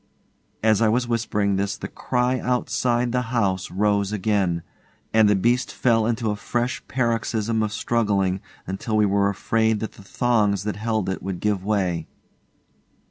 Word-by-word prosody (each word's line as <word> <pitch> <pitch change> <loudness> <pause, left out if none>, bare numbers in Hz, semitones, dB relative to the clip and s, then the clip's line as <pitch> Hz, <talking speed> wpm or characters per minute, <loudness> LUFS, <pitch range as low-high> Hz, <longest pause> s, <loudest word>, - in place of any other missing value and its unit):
As 110 -1 +4
I 110 - +4
was 120 +2 +1
whispering 105 -4 0
this 100 +1 -1
the - - -5
cry 125 +1 0
outside 125 -1 0
the 125 +1 +1
house 100 -6 0
rose 100 +1 +1
again, 95 -5 0 0.5
and 110 -1 +5
the 105 - +4
beast 120 +6 +1
fell 115 -3 +2
into 115 -2 0
a - - -2
fresh 120 +4 -2
paroxysm 115 -3 0
of 110 -1 -1
struggling 100 -3 0 0.4
till 110 -2 -1
we 105 - +4
were 100 0 +2
afraid 110 +2 +1
that 110 - -4
the 100 - -15
thongs 105 -3 +1
that 105 0 -3
held 110 -2 -1
it 95 - -2
would 95 -2 -4
give 105 -3 0
way. 95 -5 0
110 Hz, 160 wpm, -23 LUFS, 100-115 Hz, 0.5 s, and